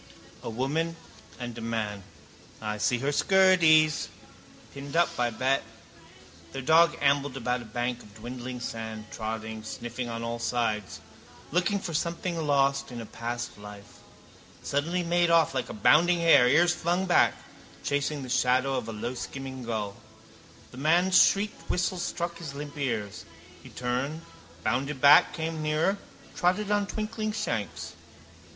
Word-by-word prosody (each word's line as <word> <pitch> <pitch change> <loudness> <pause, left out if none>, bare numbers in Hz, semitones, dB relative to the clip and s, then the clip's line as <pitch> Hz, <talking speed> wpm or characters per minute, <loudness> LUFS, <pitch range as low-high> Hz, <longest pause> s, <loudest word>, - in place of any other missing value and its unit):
A - - -5
woman 145 +8 -1 0.4
and 120 -2 -5
a - - -7
man. 110 -3 -3 0.6
I 105 -1 -4
see 120 +3 +2
her 135 +4 -1
skirties. 165 -3 +4 0.7
Pinned 140 +1 -8
up, 170 0 +4
I 120 -1 +2
bet. 130 +4 +1 0.9
Their 135 -1 -5
dog 165 +4 +5
ambled 140 -1 +2
about 125 0 -1
a - - -10
bank 120 +2 -3
of 105 0 -16
dwindling 125 +2 -7
sand, 110 -2 -5
trotting, 110 0 -5
sniffing 120 +2 -5
on 115 0 -4
all 115 0 -3
sides. 115 -4 -2 0.5
Looking 180 +5 +1
for 180 -3 -5
something 170 +2 -2
lost 140 -1 +2
in 120 - -6
a 115 - -6
past 120 0 -5
life. 105 0 -12 0.6
Suddenly 170 +6 -1
he - - -6
made 175 0 +3
off 165 -3 +4
like 130 -2 -2
a - - -5
bounding 170 - +4
hare, 165 -7 +6
ears 170 +7 +4
flung 175 +2 0
back, 180 - +4 0.5
chasing 145 0 -1
the - - -7
shadow 130 +2 +2
of 115 -3 -4
a - - -5
lowskimming 130 +3 -5
gull. 105 -3 -3 0.8
The 125 - -12
man's 175 +5 +5
shrieked 205 +2 0
whistle 180 0 0
struck 170 -1 -3
his 150 -5 -7
limp 145 0 -7
ears. 115 -7 -3 0.4
He - - -13
turned, 130 +6 -3 0.4
bounded 130 +5 -1
back, 145 +6 +7
came 160 -1 -3
nearer, 155 +6 +1 0.3
trotted 200 +4 +1
on 205 -1 +2
twinkling 215 0 -3
shanks. 115 - -3
135 Hz, 150 wpm, -28 LUFS, 120-170 Hz, 0.9 s, back